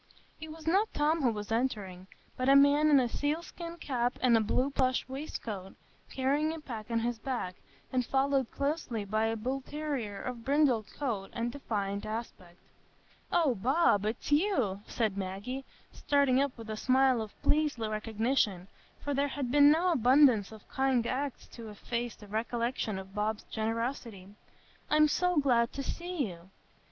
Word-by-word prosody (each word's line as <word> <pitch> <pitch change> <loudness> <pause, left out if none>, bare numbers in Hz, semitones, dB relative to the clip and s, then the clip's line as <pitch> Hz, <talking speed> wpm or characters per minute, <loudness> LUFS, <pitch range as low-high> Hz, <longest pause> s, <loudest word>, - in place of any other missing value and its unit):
It 315 0 -8
was 320 0 -11
not 390 +7 +2
Tom 305 +2 +2
who 255 - +3
was 210 0 -6
entering, 205 -6 -2 0.3
but 255 +1 0
a 275 - +7
man 285 +2 +6
in 285 -2 +6
a 250 - +2
sealskin 335 +5 -4
cap 245 -6 -1
and 250 -2 +4
a 225 - +4
blue 255 +6 0
plush 255 -2 +1
waistcoat, 230 -8 -6 0.3
carrying 285 +4 0
a 325 - -5
pack 230 -7 -7
on 230 -1 0
his 235 -1 -2
back, 235 -7 -3 0.4
and 255 -1 +2
followed 270 0 +1
closely 280 -7 -2
by 215 +2 0
a 225 0 -1
bullterrier 265 -2 -3
of 245 -2 -6
brindled 270 -5 +2
coat 225 -9 -3
and 235 0 -2
defiant 205 -7 -3
aspect. 210 -6 -6 0.7
"Oh, 320 -7 +3
Bob, 235 - +2
it's 225 +6 -4
you!" 285 - +2
said 215 -4 -1
Maggie, 200 +8 -4 0.3
starting 280 -2 +2
up 280 -3 -1
with 225 -1 -7
a 215 - -4
smile 260 0 +3
of 215 -1 -8
pleased 300 -2 +2
recognition, 215 -3 -1 0.3
for 290 - -1
there 280 +1 +1
had 275 -3 -3
been 290 +1 +7
no 335 +4 +3
abundance 255 - +4
of 220 -1 -13
kind 265 -3 +1
acts 275 +2 -3
to 230 -2 -9
efface 235 +3 -4
the 210 - -14
recollection 230 0 -2
of 190 0 -9
Bob's 210 +1 -2
generosity; 225 -3 -3 0.6
"I'm 305 0 +5
so 360 +3 +1
glad 240 -5 +3
to 275 - -4
see 345 -1 -3
you." 175 -1 -11
250 Hz, 165 wpm, -30 LUFS, 220-285 Hz, 0.7 s, a